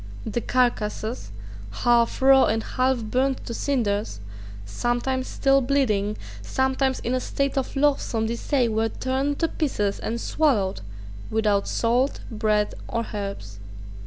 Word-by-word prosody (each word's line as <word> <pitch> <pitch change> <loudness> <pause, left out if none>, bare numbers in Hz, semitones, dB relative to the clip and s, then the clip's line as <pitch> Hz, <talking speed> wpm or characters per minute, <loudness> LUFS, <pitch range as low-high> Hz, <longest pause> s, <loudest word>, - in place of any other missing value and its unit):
The 225 +2 -2
carcasses, 225 - -1 0.4
half 235 - +2
raw 270 0 +7
and 220 +1 0
half 255 -2 0
burned 255 +4 0
to 235 - -4
cinders, 215 - -1 0.5
sometimes 240 - -1
still 275 0 +3
bleeding, 220 -6 +1 0.2
sometimes 265 0 0
in 240 - -2
a 255 - +1
state 275 +2 -1
of 270 0 -2
loathsome 275 -5 +1
decay, 235 +3 0
were 225 0 0
torn 265 +4 -1
to 330 - +1
pieces 210 -11 -1
and 235 +1 -3
swallowed 230 -11 +1 0.5
without 210 -2 +1
salt, 245 +4 +1
bread, 210 -1 +1
or 230 0 -2
herbs. 195 - -5
240 Hz, 130 wpm, -24 LUFS, 215-265 Hz, 0.5 s, raw